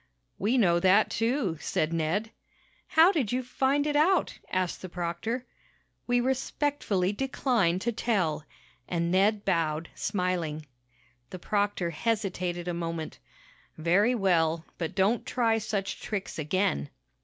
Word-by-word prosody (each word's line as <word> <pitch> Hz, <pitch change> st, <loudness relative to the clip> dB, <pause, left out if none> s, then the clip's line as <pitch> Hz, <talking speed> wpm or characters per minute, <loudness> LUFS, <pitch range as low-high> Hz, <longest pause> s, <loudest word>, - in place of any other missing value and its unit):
"We 225 Hz, +7 st, +2 dB
know 175 Hz, -7 st, +4 dB
that, 190 Hz, +4 st, +4 dB
too," 225 Hz, -, 0 dB
said 155 Hz, +2 st, -1 dB
Ned. 170 Hz, +8 st, -1 dB, 0.6 s
"How 325 Hz, +4 st, +6 dB
did 275 Hz, -, 0 dB
you 255 Hz, +1 st, 0 dB
find 270 Hz, +3 st, +1 dB
it 295 Hz, -1 st, 0 dB
out?" 330 Hz, +3 st, +2 dB
asked 185 Hz, -1 st, -1 dB
the 185 Hz, -, -7 dB
proctor. 180 Hz, +9 st, -3 dB, 0.6 s
"We 245 Hz, 0 st, +3 dB
respectfully 260 Hz, -6 st, 0 dB
decline 235 Hz, -7 st, +1 dB
to 230 Hz, +5 st, -1 dB
tell," 195 Hz, -10 st, 0 dB, 0.4 s
and 170 Hz, -1 st, -1 dB
Ned 200 Hz, +3 st, +2 dB
bowed, 165 Hz, -3 st, 0 dB
smiling. 180 Hz, -6 st, -2 dB, 0.6 s
The -, -, -7 dB
proctor 200 Hz, -2 st, -1 dB
hesitated 180 Hz, -3 st, -2 dB
a 175 Hz, -, -1 dB
moment. 165 Hz, -2 st, -4 dB, 0.6 s
"Very 190 Hz, +10 st, +3 dB
well. 165 Hz, -5 st, +2 dB
But 170 Hz, +1 st, -3 dB
don't 200 Hz, +5 st, +2 dB
try 225 Hz, -2 st, +1 dB
such 200 Hz, -2 st, -3 dB
tricks 200 Hz, -5 st, -4 dB
again." 150 Hz, -, 0 dB
195 Hz, 130 wpm, -28 LUFS, 170-235 Hz, 0.6 s, How